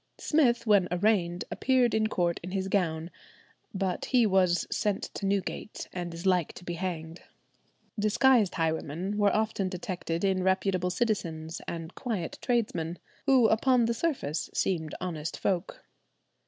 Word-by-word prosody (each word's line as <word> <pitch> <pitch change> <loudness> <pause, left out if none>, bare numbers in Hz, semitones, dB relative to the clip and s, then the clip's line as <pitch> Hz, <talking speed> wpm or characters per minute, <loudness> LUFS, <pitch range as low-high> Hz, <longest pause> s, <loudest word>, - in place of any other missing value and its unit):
Smith 255 -7 +2
when 200 -4 +4
arraigned 180 -2 +1
appeared 255 -3 +2
in 220 0 +2
court 175 -5 0
in 180 - -6
his 190 0 -2
gown, 170 -4 0 0.6
but 190 -3 -2
he 245 -3 +4
was 185 -3 +3
"sent 205 -2 0
to 195 - -3
Newgate, 200 +2 -3
and 175 -1 -4
is 170 +2 -8
like 180 -4 +2
to - - -11
be 175 - -4
hanged." 170 -2 -4 0.8
Disguised 215 0 +4
highwaymen 165 +4 -1
were 205 -1 +4
often 215 -3 0
detected 175 -2 -4
in 190 -1 +2
reputable 190 -1 +1
citizens 175 -6 -2
and 165 0 -5
quiet 220 -9 -4
tradesmen, 190 -9 -1 0.3
who 260 -4 +6
upon 240 +2 +3
the 235 - +1
surface 230 - -2
seemed 160 -5 -1
honest 165 -4 -4
folk. 185 -1 -2
190 Hz, 140 wpm, -29 LUFS, 170-215 Hz, 0.8 s, who